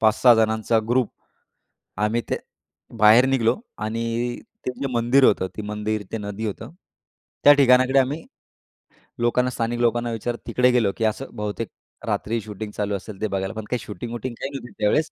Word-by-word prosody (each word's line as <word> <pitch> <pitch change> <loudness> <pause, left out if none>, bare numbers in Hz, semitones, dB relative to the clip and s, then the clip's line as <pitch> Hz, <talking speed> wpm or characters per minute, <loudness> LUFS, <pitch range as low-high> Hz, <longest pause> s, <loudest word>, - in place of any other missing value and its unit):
5-6 110 +2 +5
जणांचा 110 +1 +2
ग्रुप 120 -2 +2 0.9
आम्ही 110 +3 +1
ते - - 0 0.6
बाहेर 110 +4 +7
निघालो, 130 - +2 0.2
आणि 115 +3 -2 0.3
ते 125 - 0
जे 140 - 0
मंदिर 120 +3 +3
होतं, 95 -4 +3
ते - - -2
मंदिर, 105 0 -3
ते 115 - -2
नदी 105 +1 -5
होतं, 110 +6 -5 0.7
त्या 145 - +9
ठिकाणाकडे 130 -1 +5
आम्ही 145 +5 -1 0.9
लोकांना, 125 +2 +2
स्थानिक 120 0 -2
लोकांना 120 0 +1
विचारत 120 +1 -3
तिकडे 125 0 +3
गेलो. 115 -5 +2
की 115 - -2
असं 120 +5 -1
बहुतेक 105 +2 -3 0.4
रात्री 115 +2 -1
शूटिंग 105 0 -7
चालू 105 -1 -1
असेल 100 +1 -8
ते 110 - +1
बघायला. 95 0 -3
पण 110 -1 -5
काही 125 - 0
शूटिंग-वूटिंग 120 +5 -5
काही 135 - -3
नव्हती 125 -3 -7
त्यावेळेस. 150 +10 +2
115 Hz, 165 wpm, -23 LUFS, 105-125 Hz, 0.9 s, त्या